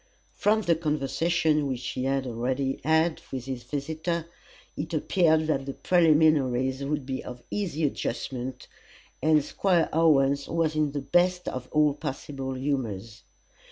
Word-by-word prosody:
From 215 Hz, +1 st, +2 dB
the 170 Hz, -3 st, +3 dB
conversation 155 Hz, 0 st, +1 dB
which 130 Hz, -2 st, -3 dB
he 130 Hz, -, -3 dB
had 135 Hz, 0 st, 0 dB
already 130 Hz, +3 st, -2 dB
had 160 Hz, +2 st, +2 dB
with 130 Hz, -2 st, -4 dB
his 130 Hz, -2 st, -4 dB
visitor, 155 Hz, +5 st, -3 dB, 0.5 s
it 160 Hz, +2 st, -4 dB
appeared 160 Hz, 0 st, +3 dB
that 135 Hz, -3 st, -1 dB
the 135 Hz, -, -4 dB
preliminaries 150 Hz, -6 st, +3 dB
would 145 Hz, -1 st, -2 dB
be 130 Hz, 0 st, -4 dB
of 125 Hz, -1 st, -9 dB
easy 170 Hz, -6 st, -2 dB
adjustment, 130 Hz, -1 st, -4 dB, 0.5 s
and 155 Hz, -1 st, +4 dB
Squire 180 Hz, -4 st, +1 dB
Owens 140 Hz, -4 st, +3 dB
was 165 Hz, -1 st, 0 dB
in 150 Hz, -2 st, +1 dB
the 145 Hz, -, -2 dB
best 180 Hz, +4 st, +2 dB
of 130 Hz, 0 st, -4 dB
all 150 Hz, -1 st, +3 dB
possible 135 Hz, -2 st, -5 dB
humours. 115 Hz, -6 st, -3 dB
145 Hz, 140 wpm, -27 LUFS, 130-160 Hz, 0.5 s, and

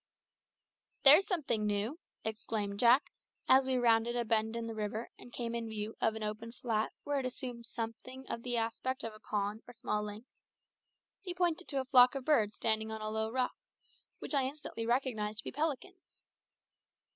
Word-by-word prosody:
"There's 305 Hz, +9 st, +9 dB
something 285 Hz, -, 0 dB
new!" 210 Hz, +9 st, -1 dB, 0.2 s
exclaimed 215 Hz, -2 st, -3 dB
Jack, 245 Hz, +5 st, +5 dB, 0.4 s
as 265 Hz, 0 st, +6 dB
we 260 Hz, -, +1 dB
rounded 235 Hz, -1 st, +3 dB
a 240 Hz, -1 st, 0 dB
bend 220 Hz, 0 st, +2 dB
in 230 Hz, 0 st, -3 dB
the 225 Hz, -, -5 dB
river 215 Hz, +1 st, -4 dB
and 245 Hz, -, -13 dB
came 235 Hz, -1 st, -4 dB
in 230 Hz, -1 st, -3 dB
view 215 Hz, 0 st, -5 dB
of 220 Hz, -, +2 dB
an 220 Hz, -, -5 dB
open 215 Hz, +2 st, -4 dB
flat 225 Hz, -3 st, -1 dB
where 290 Hz, -1 st, 0 dB
it 265 Hz, -, -3 dB
assumed 245 Hz, -2 st, -6 dB
somewhat 235 Hz, +2 st, -6 dB
the 245 Hz, 0 st, -1 dB
aspect 245 Hz, +4 st, -2 dB
of 225 Hz, -, -4 dB
a 215 Hz, -, -13 dB
pond 210 Hz, 0 st, -2 dB
or 245 Hz, -, -12 dB
small 230 Hz, -3 st, -1 dB
lake. 210 Hz, +2 st, -7 dB, 1.0 s
He 360 Hz, -3 st, -5 dB
pointed 355 Hz, -1 st, 0 dB
to 275 Hz, -3 st, +1 dB
a -, -, -7 dB
flock 255 Hz, -1 st, +6 dB
of 270 Hz, -2 st, -4 dB
birds 220 Hz, -9 st, +3 dB
standing 220 Hz, 0 st, +1 dB
on 220 Hz, 0 st, -5 dB
a 215 Hz, 0 st, -3 dB
low 220 Hz, 0 st, -1 dB
rock, 250 Hz, +2 st, 0 dB, 0.6 s
which -, -, -3 dB
I 275 Hz, -2 st, +2 dB
instantly 265 Hz, -5 st, -4 dB
recognised 235 Hz, -4 st, 0 dB
to -, -, -5 dB
be -, -, -5 dB
pelicans. 325 Hz, +5 st, -4 dB
235 Hz, 180 wpm, -33 LUFS, 220-260 Hz, 1.0 s, There's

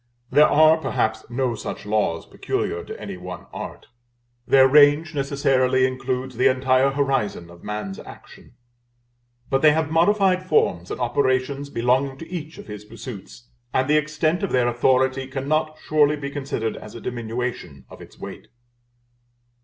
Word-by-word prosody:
There 150 Hz, +4 st, +6 dB
are, 155 Hz, +2 st, +5 dB
perhaps, 110 Hz, -7 st, -1 dB
no 125 Hz, 0 st, -1 dB
such 105 Hz, -, -6 dB
laws 105 Hz, -6 st, 0 dB
peculiar -, -, -3 dB
to -, -, -8 dB
any -, -, -7 dB
one 90 Hz, 0 st, -8 dB
art. -, -, -7 dB, 0.6 s
Their 135 Hz, -1 st, +6 dB
range 150 Hz, +3 st, +5 dB
necessarily 135 Hz, -2 st, +2 dB
includes 130 Hz, -1 st, -3 dB
the 130 Hz, +2 st, +4 dB
entire 130 Hz, +1 st, +3 dB
horizon 135 Hz, -11 st, -1 dB
of 85 Hz, 0 st, -16 dB
man's 105 Hz, -2 st, -5 dB
action. -, -, -14 dB, 1.0 s
But 135 Hz, 0 st, +2 dB
they 155 Hz, -1 st, +6 dB
have 160 Hz, 0 st, -1 dB
modified 185 Hz, +2 st, +3 dB
forms 90 Hz, -, +1 dB
and -, -, -5 dB
operations 130 Hz, +2 st, 0 dB
belonging 130 Hz, +2 st, 0 dB
to 165 Hz, -, -9 dB
each 160 Hz, -3 st, -6 dB
of -, -, -10 dB
his 105 Hz, -1 st, -8 dB
pursuits, 115 Hz, +1 st, -10 dB, 0.3 s
and 130 Hz, 0 st, +2 dB
the 150 Hz, +1 st, +4 dB
extent 155 Hz, +3 st, 0 dB
of 200 Hz, -, -2 dB
their 125 Hz, -1 st, +2 dB
authority 130 Hz, +2 st, +1 dB
cannot 155 Hz, +4 st, -1 dB
surely 150 Hz, -1 st, +2 dB
be 140 Hz, -1 st, -6 dB
considered 135 Hz, -6 st, -3 dB
as 105 Hz, -, -11 dB
a -, -, -7 dB
diminution 115 Hz, -, -5 dB
of -, -, -13 dB
its -, -, -14 dB
weight. -, -, -9 dB
130 Hz, 155 wpm, -23 LUFS, 120-145 Hz, 1.0 s, There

